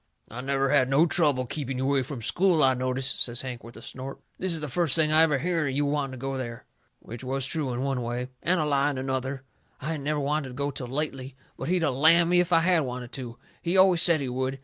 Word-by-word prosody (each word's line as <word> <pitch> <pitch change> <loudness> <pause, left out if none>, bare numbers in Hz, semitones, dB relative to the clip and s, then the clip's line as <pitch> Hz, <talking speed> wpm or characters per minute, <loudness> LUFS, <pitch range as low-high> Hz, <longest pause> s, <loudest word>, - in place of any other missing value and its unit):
"I 120 +3 -6
never 135 0 0
had 130 -3 +3
no 140 +5 +4
trouble 145 -7 +2
keeping 135 0 -4
you 130 - -2
away 135 0 +2
from 125 -2 -6
school, 175 - +2
I 130 -1 +5
notice," 130 +1 -2
says 120 -3 +2
Hank, 125 -2 -6
with 115 +1 -12
a - - -12
snort. 130 +1 -7 0.2
"This 185 0 -1
is 165 - -2
the 150 - -4
first 160 +2 +2
I 160 - +5 0.2
ever 155 -3 +4
hearn 165 +1 -1
of 135 - -4
you 145 +1 +1
wanting 140 -2 -1
to - - -7
go 135 +1 -4
there." 120 -3 -6 0.3
Which 120 +3 -10
was 135 +1 -2
true 145 -3 -2
in 125 +2 -3
one 135 -2 -1
way, 120 +2 -4
and 180 +1 +1
a 155 - +1
lie 140 -1 +2
in 140 - -4
another. 130 +1 -3 0.4
I 145 +2 -4
hadn't 150 -4 -4
never 150 0 0
wanted 145 0 -1
to 130 - -9
go 140 +1 -2
till 130 -2 -7
lately, 135 -1 -4 0.2
but - - -6
he'd 180 0 +1
of 145 - +1
lammed 165 +5 +4
me 180 - +5
if 180 0 +1
I 165 -1 +5
had 175 0 +3
of 150 - -1
wanted 125 -1 -6
to. 120 -3 -7 0.2
He 175 +2 0
always 185 -3 +6
said 170 -4 +4
he 135 - -2
would. 130 +2 -3
135 Hz, 265 wpm, -26 LUFS, 130-155 Hz, 0.4 s, always